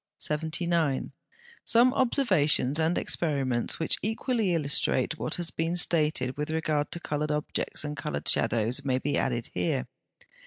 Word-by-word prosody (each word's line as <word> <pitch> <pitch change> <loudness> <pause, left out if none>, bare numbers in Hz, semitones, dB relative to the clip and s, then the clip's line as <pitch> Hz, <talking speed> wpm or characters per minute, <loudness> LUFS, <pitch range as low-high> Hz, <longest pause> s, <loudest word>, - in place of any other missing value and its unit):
79. 160 -1 -1 0.5
Some 245 +2 +4
observations 175 - +2
and 160 +2 +1
experiments 135 -7 0
which 160 - +2
equally 220 -3 -1
illustrate 145 -1 +1
what - - -1
has 175 -1 +1
been 165 +2 -2
stated 150 -7 0
with 150 +1 -3
regard 155 -2 -1
to 170 - -3
coloured 150 -2 -3
objects 150 0 -1
and 150 0 -5
coloured 75 - -5
shadows 115 +4 +2
may 130 -2 0
be 145 +2 -3
here - - +1
added. 100 - -2
150 Hz, 140 wpm, -27 LUFS, 135-170 Hz, 0.5 s, Some